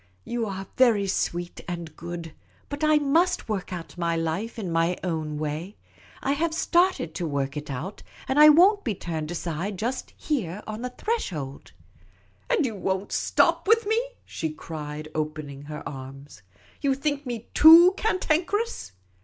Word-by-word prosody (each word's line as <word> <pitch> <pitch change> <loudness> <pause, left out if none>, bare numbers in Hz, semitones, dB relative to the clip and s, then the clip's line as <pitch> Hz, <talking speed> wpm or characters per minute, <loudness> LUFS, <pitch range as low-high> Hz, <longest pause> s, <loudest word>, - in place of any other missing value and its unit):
" 90 - -38
You 235 -2 0
are 195 -1 -5
very 230 -6 +4
sweet 175 -2 -2
and 170 -3 -6
good, 170 -1 -7 0.4
but 285 +1 -5
I 305 0 +5
must 330 +6 +2
work 200 -4 -3
out 175 0 -7
my 170 -1 0
life 165 +9 -2
in 190 -6 -4
my 165 +2 +1
own 160 -4 -2
way. 155 +6 -4 0.5
I 270 - +1
have 320 +3 0
started 345 - +2
to 170 0 -3
work 140 -1 -2
it 150 0 -6
out, 145 +10 -5 0.3
and 265 +2 +1
I 300 0 +10
won't 380 +7 +6
be 220 -5 -1
turned 160 -3 -4
aside 175 +3 -3
just 240 +6 -3
here 210 - -2
on 215 +1 -6
the 250 - -3
threshold." 180 - -4 0.4
" - - -35
And 470 - +2
you 235 - -2
won't 190 0 -2
stop - - +2
with 450 +1 +4
me? 445 +3 +2 0.2
" - - -37
she 160 - -3
cried, 155 -1 -7
opening 150 -2 -4
her 150 0 -7
arms. 135 -2 -9 0.2
" - - -28
You 275 -2 +2
think 285 0 -2
me 235 -2 -6
too 335 +4 +9
cantankerous? 405 - 0
190 Hz, 170 wpm, -26 LUFS, -, 0.5 s, I